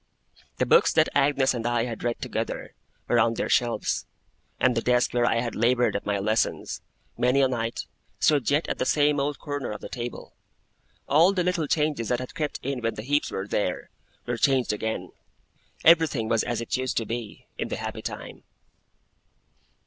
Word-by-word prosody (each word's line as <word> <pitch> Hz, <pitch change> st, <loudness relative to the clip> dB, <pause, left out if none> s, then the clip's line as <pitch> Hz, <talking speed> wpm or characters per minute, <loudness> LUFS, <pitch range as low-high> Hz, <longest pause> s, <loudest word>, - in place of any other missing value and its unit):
The -, -, +1 dB
books -, -, +5 dB
that -, -, +4 dB
Agnes 140 Hz, -2 st, +3 dB
and 120 Hz, -2 st, -3 dB
I 120 Hz, -1 st, +1 dB
had 115 Hz, -3 st, -6 dB
read 120 Hz, -1 st, -1 dB
together, -, -, -4 dB, 0.3 s
were 120 Hz, -, +3 dB
on 115 Hz, 0 st, +3 dB
their -, -, -2 dB
shelves; 120 Hz, -2 st, +1 dB, 0.5 s
and 130 Hz, -, +4 dB
the 115 Hz, -, +1 dB
desk 125 Hz, 0 st, +2 dB
where 120 Hz, -1 st, +2 dB
I 115 Hz, -, +2 dB
had 120 Hz, -2 st, -3 dB
laboured 120 Hz, +2 st, +2 dB
at 100 Hz, -, -3 dB
my 105 Hz, -1 st, +1 dB
lessons, 110 Hz, +3 st, -1 dB, 0.4 s
many 125 Hz, +3 st, +3 dB
a 135 Hz, -, +5 dB
night, 115 Hz, -2 st, -3 dB, 0.3 s
stood 145 Hz, -6 st, +3 dB
yet 145 Hz, +3 st, +2 dB
at -, -, -3 dB
the -, -, +1 dB
same 145 Hz, -1 st, +3 dB
old 140 Hz, +1 st, -1 dB
corner 145 Hz, -3 st, -4 dB
of 105 Hz, -, -5 dB
the -, -, -8 dB
table. 120 Hz, -1 st, -6 dB, 0.7 s
All 165 Hz, +7 st, +5 dB
the 180 Hz, -2 st, +1 dB
little 175 Hz, -3 st, 0 dB
changes 150 Hz, -6 st, 0 dB
that 125 Hz, -, +2 dB
had 130 Hz, -, -7 dB
crept 155 Hz, -5 st, -3 dB
in 135 Hz, -1 st, -2 dB
when 115 Hz, 0 st, -1 dB
the 105 Hz, -, -6 dB
Heeps 145 Hz, +4 st, +1 dB
were 95 Hz, -, -4 dB
there, 100 Hz, -3 st, -2 dB, 0.3 s
were 120 Hz, 0 st, -2 dB
changed 130 Hz, -2 st, +2 dB
again. 110 Hz, +1 st, -3 dB, 0.7 s
Everything 160 Hz, -8 st, +5 dB
was 115 Hz, -1 st, +2 dB
as 120 Hz, -1 st, -2 dB
it 115 Hz, -, -2 dB
used 130 Hz, 0 st, -2 dB
to 115 Hz, -, 0 dB
be, 115 Hz, -1 st, -6 dB
in -, -, -1 dB
the -, -, -3 dB
happy -, -, -5 dB
time. -, -, -7 dB
125 Hz, 190 wpm, -26 LUFS, 115-145 Hz, 0.7 s, books